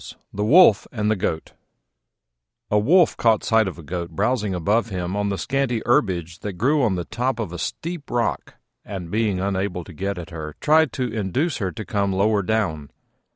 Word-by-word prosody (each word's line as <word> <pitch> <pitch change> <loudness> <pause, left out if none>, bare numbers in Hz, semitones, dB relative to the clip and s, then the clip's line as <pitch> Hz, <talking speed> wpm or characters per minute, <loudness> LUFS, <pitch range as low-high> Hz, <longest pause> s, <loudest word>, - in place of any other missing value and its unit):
THE 105 - -2
WOLF 130 - +6
AND 105 -2 0
THE - - +2
GOAT 80 -4 -3 1.2
A 105 - +4
Wolf 170 - +4
caught 115 -2 +3
sight 110 -2 +3
of 95 - -5
a 85 - -10
Goat 85 +3 -4
browsing 105 +3 0
above 105 +7 +1
him 90 -1 -3
on 105 0 0
the 100 - -2
scanty 135 -3 -1
herbage 85 -8 +1
that 105 - -5
grew 135 - +2
on 110 -7 +2
the 90 -1 -3
top 125 +2 -2
of 105 -7 -4
a 90 - -6
steep 165 - -5
rock; 120 -2 -2 0.3
and 95 -4 -7
being 105 -3 0
unable 95 -2 -2
to 90 - -12
get 100 +4 -3
at 85 -1 -8
her, 75 -2 -7
tried 155 -2 +4
to 125 -4 -2
induce 115 - -1
her 95 -4 -2
to 110 - -7
come 100 -5 0
lower 100 +2 +2
down. 90 -8 -1
105 Hz, 195 wpm, -22 LUFS, 90-115 Hz, 1.2 s, WOLF